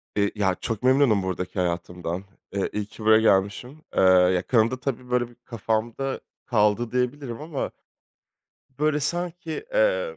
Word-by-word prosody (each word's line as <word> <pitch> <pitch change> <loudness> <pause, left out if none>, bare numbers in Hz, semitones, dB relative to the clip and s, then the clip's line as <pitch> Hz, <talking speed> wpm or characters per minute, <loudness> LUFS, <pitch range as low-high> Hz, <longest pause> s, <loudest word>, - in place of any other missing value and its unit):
Eee, 100 -1 +2
ya 95 -3 +1
çok 110 +3 -4
memnunum 130 -6 +4
buradaki 90 0 -3
hayatımdan. 90 +1 -2 0.3
Eee, 100 -1 -1
iyi 105 -1 -2
ki 110 - -12
buraya 110 0 +6
gelmişim. 110 +8 +1 0.2
Eee, - - +5
ya 90 -1 +5
kanımda 120 +1 +2
tabii 125 -2 -4
böyle 120 -1 +1
bir 120 - -19
kafamda 115 +4 -2 0.3
kaldı 110 0 +2
diyebilirim 125 0 -2
ama 150 -3 -4 1.1
böyle 150 0 +2
sanki, 170 +1 -3
emm, - - 0
115 Hz, 140 wpm, -25 LUFS, 100-140 Hz, 1.1 s, buraya